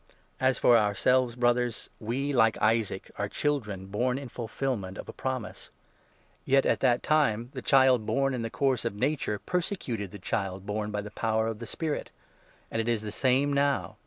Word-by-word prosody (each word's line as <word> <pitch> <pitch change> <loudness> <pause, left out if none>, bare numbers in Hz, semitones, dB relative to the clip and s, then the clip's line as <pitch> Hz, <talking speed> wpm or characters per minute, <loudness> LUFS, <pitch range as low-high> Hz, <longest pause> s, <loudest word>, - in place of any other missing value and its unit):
As 130 -1 +2
for 120 - +5
ourselves, 120 +4 +2
Brothers, 120 -1 0
we, 135 +6 -2
like 115 -3 +4
Isaac, 110 -3 0
are 105 0 -1
children 105 -11 -2
born 125 +6 0
in 135 -2 -7
28 - - -24
fulfilment 115 -5 -3
of - - -7
a - - -7
promise. 130 -4 -5 0.7
Yet 135 0 +3
at - - +2
that 125 -2 +2
time 125 -6 +2
the - - -5
child 130 -4 +4
born 135 +4 +1
in 125 - -2
the 115 - -3
29 - - -16
course 135 -4 +2
of 115 -3 -2
nature 130 -2 0
persecuted 150 - -3
the 105 - -9
child 95 -1 -3
born 105 0 -2
by 105 -1 -2
the 105 0 -9
power 110 0 0
of 110 -1 -3
the 115 - -7
Spirit; 155 +4 -3 0.6
and 115 - 0
it 115 - -2
is 115 -2 0
the 105 - -5
same 135 +4 +2
now. 140 0 0
120 Hz, 190 wpm, -28 LUFS, 105-135 Hz, 0.7 s, for